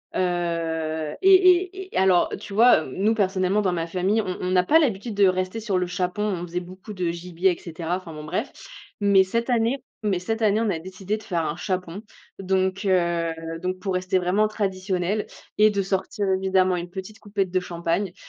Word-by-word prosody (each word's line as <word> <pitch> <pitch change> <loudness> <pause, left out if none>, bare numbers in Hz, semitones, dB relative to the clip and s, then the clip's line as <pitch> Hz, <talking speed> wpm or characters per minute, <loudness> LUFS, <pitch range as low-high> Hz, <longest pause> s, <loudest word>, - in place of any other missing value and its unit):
Heu, 165 -3 -1
et 385 0 +7
et 370 +1 +3
et - - 0
alors, 185 -2 +4
tu 200 - -9
vois, 225 -6 +6
heu, 130 - -9
nous 210 +4 +2
personnellement 190 0 +1
dans 185 -3 0
ma 165 -1 -2
famille, 190 +6 +1
on 185 -3 -4
on 180 0 -2
n'a 180 -1 +4
pas 320 - +5
l'habitude 225 -6 -1
de 200 -1 +5
rester 185 +4 -1
sur 205 -4 -1
le 180 -1 0
chapon. 180 +3 -2
On 185 -5 -2
faisait 175 +1 -3
beaucoup 185 +4 -10
de 180 -3 -1
gibier 175 +2 0
et - - -16
cetera. 170 +1 -3
Enfin, 175 -4 -10
bon, 150 0 -8
bref. 150 - -3 0.5
Mais 200 -1 +5
cette 230 +6 -2
année 235 +2 +2 0.3
mais 195 -4 +1
cette 225 +4 -3
année 215 +1 +3
on 225 - +1
a 165 - -1
décidé 190 +4 -4
de 215 - -13
faire 170 -6 -1
un 150 - -3
chapon. 185 +1 -4 0.4
Donc, 190 +1 0
heu, 170 -3 +1 0.3
donc 185 0 -3
pour 195 -2 -3
rester 185 0 +1
vraiment 190 +4 +2
traditionnel, 195 -1 -2 0.3
et 215 0 +6
de 200 -1 0
sortir 195 +1 -2
évidemment 190 -1 +2
une 175 0 -5
petite 190 +3 -8
coupette 200 -3 -2
de 185 - +2
champagne. 175 +2 -2
185 Hz, 205 wpm, -24 LUFS, 180-210 Hz, 0.5 s, et